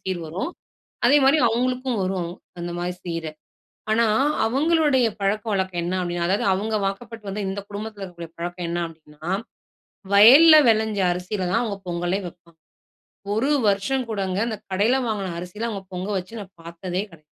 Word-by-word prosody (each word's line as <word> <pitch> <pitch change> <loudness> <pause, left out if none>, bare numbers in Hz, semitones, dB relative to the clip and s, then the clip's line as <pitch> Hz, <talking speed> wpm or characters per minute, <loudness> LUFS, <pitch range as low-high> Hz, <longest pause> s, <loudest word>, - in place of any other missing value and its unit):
சீர் 185 -2 -2
வரும். 175 - -4 0.6
அதே 290 - +6
மாரி 275 +4 +5
அவுங்களுக்கும் 250 0 -1
வரும், 185 -2 -2 0.3
அந்த 175 0 -4
மாரி 175 +1 -2
சீரு. 165 -2 -4 0.6
ஆனா 230 +1 +3 0.4
அவங்களுடைய 285 0 +3
பழக்க 205 +2 0
வழக்கம் 190 -3 -1
என்னா 180 +2 -1
அப்படினா, 175 -1 -2
அதாவது 195 +2 +1
அவுங்க 215 +3 -1
வாக்கப்பட்டு 215 +1 -6
வந்த, 200 +2 -3
இந்த 200 +1 -4
குடும்பத்தில 210 0 -7
இருக்கக்கூடிய 170 -3 -8
பழக்கம் 175 +1 -4
என்னா 170 +1 -1
அப்படினா, 155 -2 -18 0.9
வயல்ல 270 +11 +9
வெளைஞ்ச 220 -2 +1
அரிசியில 180 +2 -3
தான் 230 - +2
அவுங்க 215 -4 -3
பொங்கலே 175 +2 -1
வெப்பா 170 0 -15 0.8
1 245 +6 +1 0.2
வருஷம் 205 +7 +1
கூடங்க 195 -3 -2
இந்த 220 - -3
கடையில 205 +7 +2
வாங்கின 200 -5 -2
அரிசில 180 +6 -5
அவுங்க 200 -4 -5
பொங்க 180 +2 -4
வச்சு 190 +5 -5
நான் 195 -2 -10
பாத்ததே 170 +2 -4
கெடை 165 -2 -17
195 Hz, 155 wpm, -23 LUFS, 175-225 Hz, 0.9 s, வயல்ல